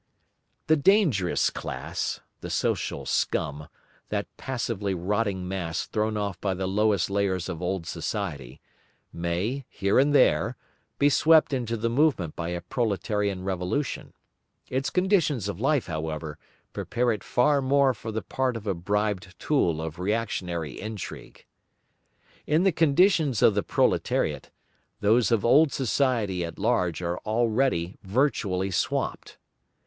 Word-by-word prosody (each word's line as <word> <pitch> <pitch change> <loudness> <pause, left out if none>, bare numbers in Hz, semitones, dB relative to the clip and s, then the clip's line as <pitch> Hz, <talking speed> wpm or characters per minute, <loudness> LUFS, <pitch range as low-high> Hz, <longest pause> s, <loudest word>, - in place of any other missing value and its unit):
The 155 - +4
"dangerous 145 - +3
class," 65 - -4 0.2
the - - -7
social - - -1
scum, 75 +1 -1 0.4
that - - -1
passively 115 -6 -3
rotting 95 +1 -1
mass 85 -4 -3
thrown 110 0 -1
off 100 -3 -3
by 95 -2 0
the 95 +1 -3
lowest 100 -1 +1
layers 100 -3 0
of 90 -2 -5
old 90 -1 -2
society, 70 -4 -4 0.5
may, 90 +11 -2
here 100 +4 +1
and 140 +2 +4
there, 130 - +3 0.4
be 145 - +4
swept 155 +1 +5
into 120 -3 -1
the 115 +2 -1
movement 120 - +1
by 85 0 -4
a 85 0 -3
proletarian 100 -1 -1
revolution; 95 +9 -2 0.6
its 130 +1 -1
conditions 180 - +1
of 100 -3 -4
life, 140 +2 +2
however, 80 -1 -4 0.3
prepare 120 0 0
it 105 -3 -3
far 140 +3 +2
more 135 0 +3
for 110 0 -7
the 110 +1 -3
part 130 -3 -1
of 110 - -10
a 100 - 0
bribed 100 +1 -2
tool 90 - +1
of 80 +1 -5
reactionary 90 - -2
intrigue. 110 -2 -8 1.0
In 155 +4 +3
the 195 - +4
conditions 160 - +3
of 110 - +6
the 105 - +1
proletariat, - - 0 0.5
those 110 +3 +3
of 115 -4 +2
old 145 +5 +5
society 120 - 0
at 85 -1 -6
large 90 -8 0
are 85 +1 -2
already 110 -5 0
virtually 100 -4 0
swamped. - - -2
105 Hz, 135 wpm, -26 LUFS, 90-130 Hz, 1.0 s, of